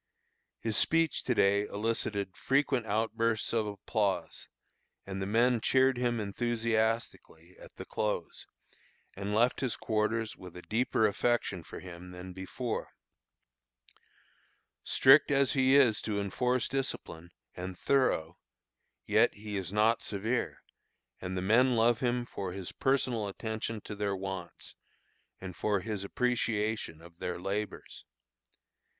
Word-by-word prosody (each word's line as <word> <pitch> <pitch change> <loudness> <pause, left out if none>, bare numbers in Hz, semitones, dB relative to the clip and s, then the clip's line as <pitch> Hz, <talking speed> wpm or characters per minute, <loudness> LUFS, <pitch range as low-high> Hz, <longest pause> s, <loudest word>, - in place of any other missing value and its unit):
His 110 -2 +1
speech 165 -1 +2
to 125 - +1
day 100 +1 +3
elicited 100 -2 -2
frequent 135 -3 +1
outbursts 110 +1 0
of 110 -2 +1
applause, 100 -3 -2 0.6
and 95 0 -5
the 95 - -2
men 115 +2 +3
cheered 130 +2 +4
him 120 -2 0
enthusiastically 110 -5 -1
at - - -14
the - - -8
close, 105 -5 -3 0.7
and 100 +2 -3
left 120 +3 +3
his 130 -3 0
quarters 110 +1 -1
with 90 -1 -11
a 90 - -10
deeper 110 0 +1
affection 105 -3 0
for - - -10
him 90 0 -10
than 90 +1 -9
before. 105 +6 -4 1.9
Strict 135 +3 +6
as 140 -2 +3
he 130 0 +4
is 125 -7 +5
to 105 -2 -2
enforce 125 +6 0
discipline, 110 -11 -4 0.2
and 90 0 -6
thorough, 90 - +1 0.7
yet - - +3
he 105 0 -6
is 95 -3 -3
not 110 +2 +3
severe; 110 +5 -2 0.6
and 95 0 -4
the 90 - -2
men 120 +6 +4
love 115 0 +3
him 125 -1 0
for 95 -6 -5
his 95 -2 -6
personal 130 -5 0
attention 110 +2 -4
to 105 - -7
their 100 -1 -1
wants, 95 -2 -6 0.7
and 95 -2 -7
for 105 -2 0
his 105 -2 -4
appreciation 110 -6 -1
of 85 0 -16
their 90 -1 -3
labors. 100 +3 -4
110 Hz, 130 wpm, -31 LUFS, 95-120 Hz, 1.9 s, Strict